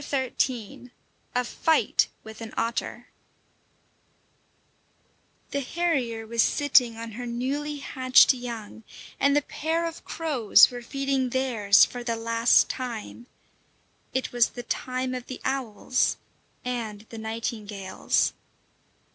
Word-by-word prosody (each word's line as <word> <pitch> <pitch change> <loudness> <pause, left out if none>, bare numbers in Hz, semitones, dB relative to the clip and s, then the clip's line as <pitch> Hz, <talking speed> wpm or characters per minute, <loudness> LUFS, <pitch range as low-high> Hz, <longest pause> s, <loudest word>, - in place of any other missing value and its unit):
XIII: 255 -4 -2 0.5
A 250 - +2
FIGHT 320 +6 +2 0.2
WITH 220 +1 -11
AN 225 -1 -8
OTTER 235 +1 -2 2.4
The 280 - -1
harrier 265 -7 -1
was 230 +1 +1
sitting 255 -5 +3
on 230 0 -6
her 245 +3 -6
newly 275 +5 -2
hatched 260 -2 +5
young, 230 -3 -7 0.4
and 280 0 +3
the 290 - +3
pair 325 +4 -2
of 330 -1 -6
crows 285 -12 +4
were 245 0 -6
feeding 275 +1 -1
theirs 235 -6 +4
for 245 -1 -7
the 230 -1 -1
last 230 +1 +3
time; 240 -1 -6 0.8
it 260 - -2
was 240 -1 +3
the 245 - -8
time 255 +1 -3
of 250 -1 -6
the 255 - -7
owls 250 -2 0 0.5
and 230 -4 -4
the 225 - -8
nightingales. 220 -3 -2
245 Hz, 115 wpm, -26 LUFS, 230-265 Hz, 2.4 s, hatched